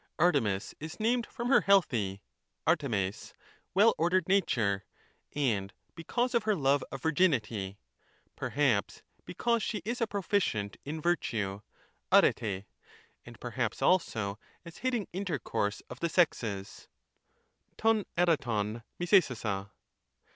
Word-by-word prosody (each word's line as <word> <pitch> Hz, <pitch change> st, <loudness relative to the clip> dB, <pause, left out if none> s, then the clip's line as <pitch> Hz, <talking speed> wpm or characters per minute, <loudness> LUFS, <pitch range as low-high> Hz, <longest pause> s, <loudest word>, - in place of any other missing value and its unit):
Artemis 125 Hz, -, +2 dB
is 160 Hz, +3 st, -7 dB
named 235 Hz, +2 st, +1 dB
from 240 Hz, -1 st, -4 dB
her 275 Hz, -, +6 dB
healthy 115 Hz, -, +2 dB, 0.4 s
{dpTEftfjg), 120 Hz, -, 0 dB, 0.4 s
well 210 Hz, +4 st, +6 dB
ordered 175 Hz, +1 st, +2 dB
nature, 115 Hz, -, +2 dB, 0.5 s
and 110 Hz, -9 st, 0 dB, 0.2 s
because 240 Hz, +10 st, -1 dB
of 235 Hz, -, +3 dB
her 215 Hz, -1 st, +1 dB
love 140 Hz, -3 st, +2 dB
of 135 Hz, -1 st, -7 dB
virginity, 115 Hz, -, +1 dB, 0.6 s
perhaps 130 Hz, -8 st, 0 dB, 0.2 s
because 235 Hz, +5 st, 0 dB
she 210 Hz, -4 st, -3 dB
is 240 Hz, +2 st, -3 dB
a 230 Hz, -, +2 dB
proficient 190 Hz, -, -1 dB
in 155 Hz, +3 st, -5 dB
virtue 110 Hz, -, -1 dB, 0.5 s
[dperr]), 100 Hz, -4 st, +3 dB, 0.6 s
and -, -, -12 dB
perhaps -, -, -2 dB
also 110 Hz, -, +1 dB, 0.3 s
as 170 Hz, -1 st, -11 dB
hating 245 Hz, -6 st, -1 dB
intercourse 155 Hz, -, -2 dB
of 125 Hz, -, -9 dB
the 170 Hz, -, 0 dB
sexes 110 Hz, -, 0 dB, 0.9 s
{rbv 225 Hz, -1 st, +3 dB
dporov 120 Hz, -11 st, +1 dB
luorjoaaa). 120 Hz, -, +2 dB
150 Hz, 110 wpm, -30 LUFS, -, 0.9 s, her